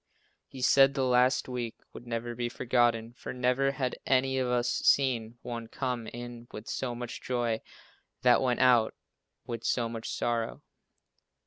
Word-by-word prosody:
He 130 Hz, -2 st, -8 dB
said 135 Hz, +1 st, +6 dB
the 135 Hz, -2 st, +1 dB
last 125 Hz, +1 st, +3 dB
week 125 Hz, -3 st, -4 dB, 0.2 s
would 120 Hz, -, -11 dB
never 120 Hz, 0 st, -3 dB
be 120 Hz, 0 st, -2 dB
forgotten, 120 Hz, -2 st, +1 dB
for -, -, -7 dB
never 125 Hz, +2 st, +2 dB
had 130 Hz, -2 st, -2 dB
any 130 Hz, 0 st, +2 dB
of 130 Hz, -, 0 dB
us 125 Hz, -1 st, +1 dB
seen 120 Hz, -3 st, +2 dB
one 115 Hz, -2 st, -5 dB
come 125 Hz, -2 st, -3 dB
in 120 Hz, 0 st, -8 dB
with 105 Hz, +2 st, -9 dB
so 125 Hz, -2 st, -3 dB
much 120 Hz, 0 st, -6 dB
joy, 120 Hz, -3 st, -1 dB, 0.6 s
that 125 Hz, -2 st, +5 dB
went 125 Hz, -1 st, +1 dB
out 120 Hz, -4 st, +4 dB, 0.5 s
with 115 Hz, -1 st, -5 dB
so 120 Hz, -2 st, +1 dB
much 115 Hz, -1 st, -6 dB
sorrow. 115 Hz, -1 st, -2 dB
120 Hz, 155 wpm, -29 LUFS, 115-130 Hz, 0.6 s, said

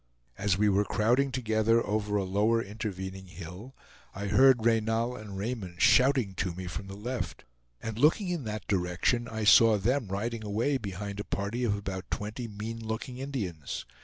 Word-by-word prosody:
As 100 Hz, -1 st, +1 dB
we 105 Hz, +1 st, +3 dB
were 100 Hz, 0 st, +3 dB
crowding 120 Hz, +7 st, +2 dB
together 115 Hz, -2 st, +2 dB
over 105 Hz, 0 st, -1 dB
a 100 Hz, -, 0 dB
lower 105 Hz, +5 st, +2 dB
intervening 95 Hz, -3 st, -5 dB
hill, 90 Hz, +8 st, -9 dB, 0.4 s
I 100 Hz, 0 st, -3 dB
heard 130 Hz, -1 st, +5 dB
Reynal 115 Hz, +1 st, +2 dB
and 105 Hz, -5 st, -8 dB
Raymond 100 Hz, -5 st, -4 dB
shouting 125 Hz, -3 st, +4 dB
to 90 Hz, -1 st, -1 dB
me 95 Hz, +1 st, -6 dB
from 90 Hz, +3 st, -6 dB
the 100 Hz, 0 st, -8 dB
left; 120 Hz, +4 st, -4 dB, 0.4 s
and 110 Hz, 0 st, -4 dB
looking 165 Hz, -, +4 dB
in 175 Hz, -5 st, -2 dB
that 105 Hz, -2 st, -4 dB
direction, 95 Hz, +5 st, +1 dB
I 110 Hz, -2 st, -4 dB
saw 110 Hz, +1 st, +7 dB
them 120 Hz, +4 st, 0 dB
riding 110 Hz, +4 st, -3 dB
away 115 Hz, +7 st, 0 dB
behind 100 Hz, -1 st, -5 dB
a -, -, -2 dB
party 105 Hz, +6 st, -3 dB
of 105 Hz, -4 st, +2 dB
about 95 Hz, -2 st, -5 dB
twenty 105 Hz, +3 st, -4 dB
mean 110 Hz, +2 st, -6 dB
looking 115 Hz, +3 st, -4 dB
Indians. 100 Hz, -, -4 dB
105 Hz, 170 wpm, -29 LUFS, 100-120 Hz, 0.4 s, saw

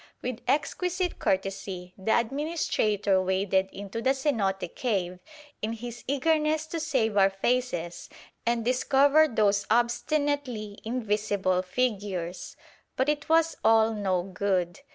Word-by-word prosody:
With 250 Hz, -1 st, -3 dB
exquisite 355 Hz, +6 st, 0 dB
courtesy, 190 Hz, -1 st, -2 dB
the 195 Hz, +3 st, +1 dB
administrator 225 Hz, -, 0 dB
waded 190 Hz, 0 st, +1 dB
into 200 Hz, +3 st, -6 dB
the 265 Hz, +3 st, +2 dB
cenote 205 Hz, -, -1 dB
cave 185 Hz, -7 st, -2 dB, 0.4 s
in 220 Hz, +2 st, -2 dB
his 240 Hz, +1 st, -8 dB
eagerness 305 Hz, +2 st, +1 dB
to 330 Hz, +1 st, -4 dB
"save 255 Hz, -10 st, 0 dB
our 195 Hz, 0 st, +6 dB
faces" 195 Hz, -4 st, -2 dB, 0.3 s
and 235 Hz, -1 st, 0 dB
discover 275 Hz, +4 st, +4 dB
those 210 Hz, -5 st, +1 dB
obstinately 240 Hz, -1 st, 0 dB
invisible 210 Hz, -5 st, 0 dB
figures. 190 Hz, -4 st, -3 dB, 0.4 s
But 260 Hz, +3 st, +1 dB
it 295 Hz, 0 st, -2 dB
was 325 Hz, 0 st, +3 dB
all 225 Hz, 0 st, +5 dB
no 190 Hz, -4 st, 0 dB
good. 185 Hz, -1 st, -1 dB
220 Hz, 115 wpm, -27 LUFS, 195-270 Hz, 0.4 s, our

